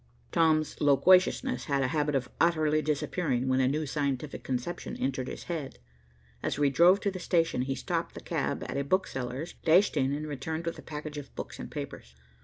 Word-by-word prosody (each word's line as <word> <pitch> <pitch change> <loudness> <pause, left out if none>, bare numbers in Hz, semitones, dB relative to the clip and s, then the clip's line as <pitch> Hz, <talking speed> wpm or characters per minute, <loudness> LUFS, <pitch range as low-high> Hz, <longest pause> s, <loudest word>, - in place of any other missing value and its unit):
Tom's 155 -2 +2
loquaciousness 185 - +4
had 140 -3 +1
a 130 - +1
habit 150 0 0
of 130 -2 0
utterly 155 -2 +3
disappearing, 145 -3 -1
when 130 0 +2
a 130 - +3
new 150 +3 0
scientific 140 -1 -2
conception 130 +7 -4
entered 130 -1 -2
his - - -6
head. 155 -6 -5 0.6
As - - -2
we 145 -1 +3
drove 175 +6 +6
to 200 - 0
the 185 - -6
station, 165 -6 +1
he 135 +1 -1
stopped 130 - -3
the - - -6
cab - - -2
at - - -4
a 140 - 0
bookseller's, 140 -2 -2
dashed 175 +4 +5
in, 135 -2 +2
and 150 +2 -2
returned 160 +3 -4
with 170 - -3
a - - -8
package 150 -1 -6
of 140 - -12
books - - -7
and - - -6
papers. 60 +1 -7
150 Hz, 195 wpm, -29 LUFS, 135-165 Hz, 0.6 s, drove